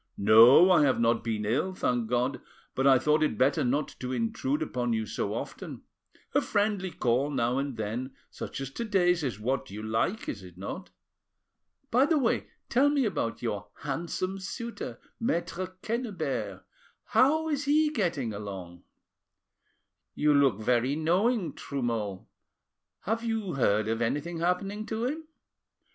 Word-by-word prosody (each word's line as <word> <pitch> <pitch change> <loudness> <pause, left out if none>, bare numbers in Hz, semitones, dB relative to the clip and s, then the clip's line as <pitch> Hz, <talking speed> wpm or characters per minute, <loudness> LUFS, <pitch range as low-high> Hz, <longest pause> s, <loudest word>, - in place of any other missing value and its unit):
No, 115 - +8
I 175 - +6
have 140 -4 +3
not 115 0 +2
been 110 -2 -2
ill, 150 - 0
thank 120 -8 0
God, 125 +3 0 0.3
but 135 +1 +1
I 135 -1 +7
thought 150 +4 +2
it 150 -8 +1
better 135 +4 +3
not 140 +4 0
to 125 0 -4
intrude 130 +5 -1
upon 125 -5 -1
you 110 -1 -1
so - - -3
often. - - -6 0.5
A - - +4
friendly 205 -2 0
call 130 -2 0
now 125 -2 0
and 140 -3 -3
then 115 +5 -4 0.2
such - - -6
as 135 -1 -5
to 235 - -4
day's 180 -6 +2
is 125 -6 -3
what 130 +5 -2
you 105 +2 -7
like, 115 - -1
is 100 - -4
it 90 -2 -13
not? 170 - -6 1.0
By 255 +4 +4
the 320 -1 +3
way, 250 -5 +1 0.2
tell 270 +4 +4
me 285 -3 +2
about 150 - -2
your - - -3
handsome 185 +3 -3
suitor, 195 - -6 0.2
Maitre 185 -5 -1 0.2
Quennebert; 210 - -3 0.4
how 310 +5 +3
is 290 -1 -1
he 300 +1 +3
getting 165 - -1
along?" 95 -4 -7 1.3
"You 150 0 +3
look 135 -7 +3
very 125 +4 +1
knowing, 180 +6 +1
Trumeau: 115 -8 -3 0.7
have 225 +3 -2
you 225 -5 -2
heard 110 -5 +2
of 115 +1 -1
anything 150 +8 -1
happening 195 +5 -1
to 225 +1 -2
him?" 310 +4 -3
140 Hz, 155 wpm, -28 LUFS, -, 1.3 s, No